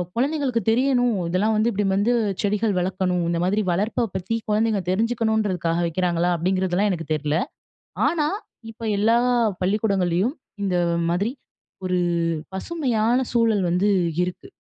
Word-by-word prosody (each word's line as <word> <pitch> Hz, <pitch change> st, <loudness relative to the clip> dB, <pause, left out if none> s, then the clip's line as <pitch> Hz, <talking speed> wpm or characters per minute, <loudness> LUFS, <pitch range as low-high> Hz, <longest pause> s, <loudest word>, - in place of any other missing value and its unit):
குழந்தைகளுக்கு 270 Hz, -2 st, 0 dB
தெரியணும், 245 Hz, 0 st, +2 dB, 0.2 s
இதெல்லாம் 210 Hz, +5 st, +1 dB
வந்து 215 Hz, +2 st, +2 dB
இப்டி 205 Hz, 0 st, -1 dB
வந்து 215 Hz, +5 st, +2 dB, 0.3 s
செடிகள் 210 Hz, 0 st, +1 dB
வளர்க்கணும். 180 Hz, -1 st, 0 dB
இந்தமாதிரி 180 Hz, +5 st, +1 dB
வளர்ப்ப 215 Hz, +6 st, 0 dB
பத்தி 190 Hz, +5 st, -2 dB
குழந்தைங்க 215 Hz, -1 st, +1 dB
தெரிஞ்சுக்கணுன்றதுக்காக 215 Hz, -5 st, 0 dB
வைக்கிறாங்களா? 175 Hz, 0 st, 0 dB
அப்டிங்கிறதெல்லாம் 185 Hz, +3 st, +1 dB
எனக்கு 165 Hz, -2 st, -4 dB
தெரில. 150 Hz, +1 st, 0 dB, 0.7 s
ஆனா, 305 Hz, -3 st, +1 dB, 0.4 s
இப்ப 225 Hz, -, -20 dB, 0.2 s
எல்லா 225 Hz, +3 st, +3 dB, 0.4 s
பள்ளிக்கூடங்கள்லையும், 195 Hz, -, +1 dB, 0.3 s
இந்த 185 Hz, -2 st, 0 dB, 0.3 s
மாதிரி 200 Hz, +7 st, 0 dB, 0.5 s
ஒரு 180 Hz, 0 st, +1 dB, 0.6 s
பசுமையான 245 Hz, -, 0 dB
சூழல் 225 Hz, -5 st, +2 dB
வந்து 180 Hz, +4 st, +2 dB, 0.3 s
இருக்கு. 180 Hz, 0 st, -5 dB
205 Hz, 115 wpm, -23 LUFS, 180-230 Hz, 0.7 s, எல்லா